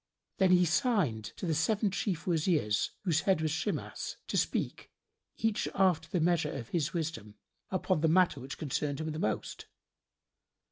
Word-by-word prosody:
Then 190 -1 +5
he 180 0 +5
signed 160 - +1
to - - -4
the 165 - +1
seven 200 +7 +1
chief 185 -4 -2
Wazirs, 160 - +1
whose 165 -5 +2
head 190 -4 +2
was 160 -1 0
Shimas, 160 - -3
to - - -2
speak, - - -1 0.5
each 225 -2 0
after 175 -5 +2
the 180 - 0
measure 165 -2 +2
of 115 - -6
his 165 -2 0
wisdom, 160 - -4 0.3
upon 185 -3 0
the 160 - +4
matter 175 -3 +4
which 130 +2 -7
concerned 145 -1 -2
him 160 0 -3
the 155 - -4
most. 110 -6 -3
165 Hz, 160 wpm, -31 LUFS, 150-185 Hz, 0.5 s, Then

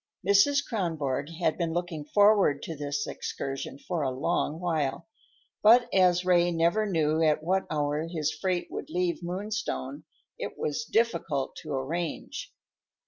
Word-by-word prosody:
Mrs. 280 +9 +4
Kronborg 155 - -2
had 165 0 -1
been 165 -2 -1
looking 170 -3 -3
forward 200 -5 +4
to 165 - -5
this 145 0 -2
excursion 135 0 -5
for 170 +3 -3
a 135 - +1
long 150 +4 -1
while, 165 -3 -1 0.5
but 240 +3 +7
as 180 -1 +4
Ray 175 -1 +4
never 170 +6 +2
knew 160 -4 +1
at 155 -1 +2
what 190 +3 0
hour 150 +1 -1
his 160 -3 -1
freight 180 +3 -2
would - - -6
leave 180 -1 -1
Moonstone, 180 - -4 0.3
it - - -5
was 150 0 -2
difficult 170 - 0
to 155 - -8
arrange. 155 +5 -4
165 Hz, 140 wpm, -28 LUFS, 150-185 Hz, 0.5 s, but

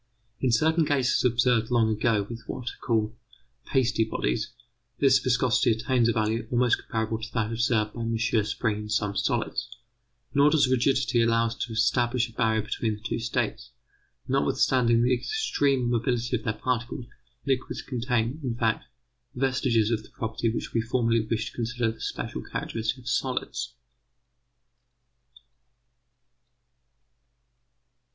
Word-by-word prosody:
In 130 0 +1
certain 160 +8 +3
cases 140 -4 +2
observed 120 -2 +2
long 115 -2 +3
ago 105 -1 +1
with 115 +1 -7
what 125 -1 -4
are - - -17
called 110 -2 +1 0.5
pasty 125 -4 +2
bodies, 60 - -2 0.5
this 135 -2 +5
viscosity 125 -2 +2
attains 120 +1 +1
a - - +4
value 110 +1 -1
almost 125 -1 +2
comparable 110 0 -2
to 115 +1 -6
that 115 -2 0
observed 115 -2 +1
by 120 - -6
M. 115 0 -1
Spring 110 -1 0
in 105 0 -6
some 105 -1 0
solids. - - -1 0.6
Nor 145 +1 +5
does 150 -3 +4
rigidity 130 -1 +2
allow 115 0 +3
us 115 0 -3
to 120 - -4
establish 120 +2 +2
a 115 - -16
barrier 110 -2 +1
between 110 0 -2
the - - -12
two 115 - -3
states. 120 0 -2 0.5
Notwithstanding 120 -3 +2
the 125 +1 +3
extreme 140 - 0
mobility 120 +1 0
of 115 - -2
their 110 - +1
particles, 120 +1 -2 0.4
liquids 135 -2 -1
contain, 125 +1 -1
in 120 -3 -2
fact, 115 -2 0 0.5
vestiges 125 -4 +1
of 110 -2 0
the - - -17
property 115 +1 -2
which 115 - -4
we 115 - +2
formerly 115 0 +1
wished 110 -1 -1
to - - -20
consider 120 -1 -1
the 110 - -13
special - - -4
characteristic 115 +3 -3
of 125 -1 -14
solids. 125 +2 -2
120 Hz, 145 wpm, -27 LUFS, 110-125 Hz, 0.6 s, this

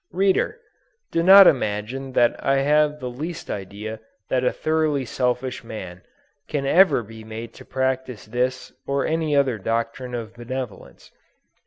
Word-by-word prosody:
Reader! 195 - +1 0.5
do 165 - +1
not 195 +3 +9
imagine 130 0 0
that 120 -1 +2
I 135 0 +2
have 150 +1 +2
the 125 - -5
least 155 +8 -6
idea 105 +3 -6 0.3
that 130 -1 +1
a 125 - +3
thoroughly 155 -4 0
selfish 125 +1 -2
man, 95 -6 -8 0.5
can 145 -2 -2
ever 155 -4 +5
be 110 +1 -11
made 110 +1 -8
to - - -13
practice 130 -3 -2
this 125 +3 -2
or 140 0 0
any 160 -2 0
other 135 -5 +2
doctrine 115 +4 -2
of 115 -2 -6
benevolence. 120 -1 -7
130 Hz, 145 wpm, -23 LUFS, 115-145 Hz, 0.5 s, not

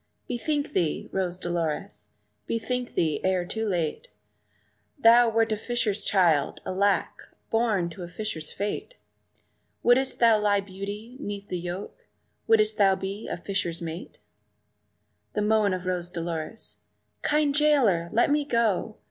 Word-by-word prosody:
"Bethink 290 +4 -2
thee, 165 -4 0
Rose 180 -2 -1
Dolores, 160 - -3 0.4
bethink 250 +2 -2
thee, 160 -3 +1
ere 185 -1 +1
too 220 +4 -3
late! 170 -5 -2 0.9
Thou 235 -2 +6
wert 225 0 +2
a - - +2
fisher's 220 -2 -1
child, 170 -7 +2
alack, 200 +2 0 0.2
born 225 -6 +2
to 175 - -10
a 175 - -5
fisher's 175 -4 -5
fate; 205 - -4 0.9
Would'st 255 +2 +3
lay 225 -3 +5
thy 205 -1 +3
beauty 200 +5 -7
'neath 205 -5 -6
the 180 - -2
yoke 175 +3 -7 0.4
would'st 435 -1 +4 0.2
be 195 +3 -5
a - - -3
fisher's 175 -2 -2
mate?" 165 +1 -7 1.2
The 210 - 0
moan 215 -1 +3
of 185 0 -3
Rose 180 -1 -2
Dolores 170 +4 -5 0.4
"Kind 300 -1 +2
jailer, 265 - +3
let 240 +5 +3
me 295 0 +3
go! 225 -5 0
205 Hz, 130 wpm, -26 LUFS, 175-235 Hz, 1.2 s, Thou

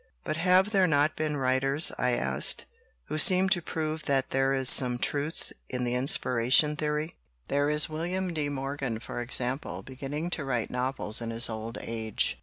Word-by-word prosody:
"But - - -2
have 185 +4 +3
there 190 -3 +3
not 150 -1 +2
been 155 -1 -2
writers," 135 +3 +2
I 125 0 0
asked, 65 - 0 0.4
"who 155 - -3
seem 185 +4 +5
to 185 -3 +2
prove 155 -1 -4
that 135 -2 0
there 135 0 +1
is 135 -1 +1
some 125 -2 +6
truth 145 +5 -2 0.2
in 125 0 -3
the 120 0 -1
inspiration 125 +2 +2
theory? 150 +2 -3 0.3
There 145 +1 +1
is 150 0 +2
William 175 +3 -3
de 150 -2 -1
Morgan, 135 -4 -4
for 120 - -6
example, 125 +3 -3
beginning 145 +5 -5
to 160 - -3
write 125 -4 -2
novels 125 -3 -1
in 115 - -4
his 115 +1 0
old 110 +1 -6
age. 110 -2 -3
140 Hz, 175 wpm, -28 LUFS, 125-155 Hz, 0.4 s, some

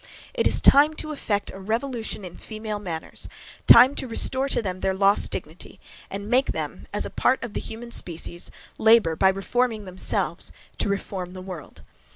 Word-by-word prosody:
It - - +2
is - - +2
time 295 +3 +6
to 310 - -3
effect 210 -8 -2
a 195 - -10
revolution 225 0 -3
in 175 - -9
female 215 -1 -6
manners, 170 -5 -3 0.4
time 250 +4 +9
to 260 - -1
restore 260 +3 +2
to - - +2
them 185 -4 -3
their 190 0 0
lost 200 +1 +3
dignity, - - -7 0.3
and 200 +1 -6
make 255 +4 +2
them, - - -5
as - - -1
a - - -6
part 260 - +1
of 235 -4 -6
the - - -2
human 235 +2 -7
species, 170 -3 -3 0.3
labour 220 -7 +5
by 190 +4 +4
reforming 215 +3 -1
themselves 185 0 -1 0.3
to - - +2
reform 190 -2 -4
the 185 - -8
world. 180 -5 -9
210 Hz, 180 wpm, -24 LUFS, 190-240 Hz, 0.4 s, time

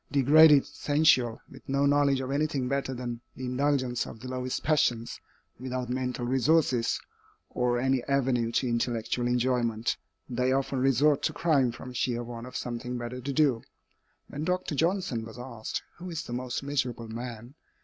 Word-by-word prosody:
Degraded, 145 +1 +7
sensual, 145 -5 +2
with - - -15
no 140 +1 +2
knowledge 140 -1 +3
of 130 0 -4
anything 140 -3 0
better 135 0 -1
than 120 -1 -5
the 130 - -6
indulgence 130 -1 0
of - - -10
the 130 - -8
lowest 130 0 -3
passions, 120 -6 +1 0.4
without 125 -1 -4
mental 125 -1 -2
resources, 130 -1 +2 0.5
or 125 0 +1
any 130 0 +1
avenue 130 -4 +1
to 130 - +1
intellectual 120 0 -1
enjoyment, 120 -2 0 0.3
they 125 +1 0
often 135 0 0
resort 135 +3 +3
to - - 0
crime 140 -7 +2
from 125 +2 -9
sheer 120 -1 -1
want 120 0 -7
of 125 - -11
something 125 +1 -4
better 120 +1 -5
to 140 +3 -3
do. 135 -5 +2 0.7
When 145 - -5
Dr. 180 -1 -1
Johnson 165 - 0
was 115 +1 -10
asked, 120 -3 -5
"Who 180 +1 -7
is 165 -2 -4
the 120 - -7
most 125 +1 -3
miserable 130 -5 -2
man?" 120 +1 -7
130 Hz, 160 wpm, -28 LUFS, 120-140 Hz, 0.7 s, Degraded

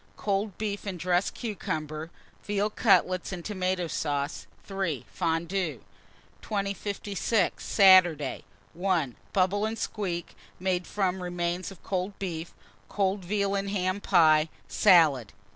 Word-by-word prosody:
Cold 200 -1 -1
beef 205 -1 -3
and 190 -2 -3
dressed 180 +2 +1
cucumber, 155 -8 -4 0.3
veal 205 +1 0
cutlets 185 -5 +2
and 175 -3 -6
tomato 185 -3 -1
sauce. 145 -2 -2 0.2
3. 190 - -3
Fondue. 165 - -1 0.6
2056. 200 0 -1
Saturday. 175 -8 +5 0.3
1. 170 -8 0 0.2
Bubble 195 +2 +2
and 220 +1 -1
squeak, 180 -7 -4 0.2
made 180 -1 -1
from 190 -2 -1
remains 175 0 -2
of 195 -4 -14
cold 190 +1 -3
beef; 170 -3 -5 0.4
cold 195 -1 0
veal 200 +2 0
and 200 0 -1
ham 185 0 -1
pie, 160 -5 +4 0.2
salad. 155 - +4
185 Hz, 115 wpm, -28 LUFS, 170-200 Hz, 0.6 s, Saturday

